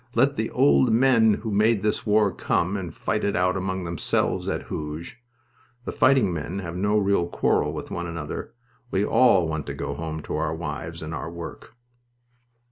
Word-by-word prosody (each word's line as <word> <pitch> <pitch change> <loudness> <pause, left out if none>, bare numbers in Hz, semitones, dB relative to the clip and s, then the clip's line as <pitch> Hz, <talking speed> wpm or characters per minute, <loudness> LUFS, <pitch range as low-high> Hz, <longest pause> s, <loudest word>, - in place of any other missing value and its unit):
Let - - +3
the - - -1
old 70 +6 +4
men 115 -3 +4
who 110 +1 -5
made 105 0 +2
this 105 +1 -1
war 105 -1 +4
come 90 +2 0
and 90 -5 -4
fight 105 +7 -2
it 100 - 0
out 90 +1 +2
among 95 0 -2
themselves, 85 0 -1
at - - -2
Hooge. 75 +9 -6 0.6
The - - -3
fighting 130 -8 +3
men 85 +3 -4
have 85 -3 -5
no 100 +3 +1
real 100 -4 +2
quarrel - - +1
with - - -7
one 85 0 -3
another. 80 -3 -5 0.4
We 100 -1 +1
all 100 -10 +4
want 80 -1 -4
to 70 - -4
go 70 0 -4
home 80 0 -5
to - - -3
our 80 - -1
wives 80 +1 -5
and 80 +1 -6
our 80 +1 -4
work." 85 -1 -9
90 Hz, 185 wpm, -25 LUFS, 80-105 Hz, 0.6 s, old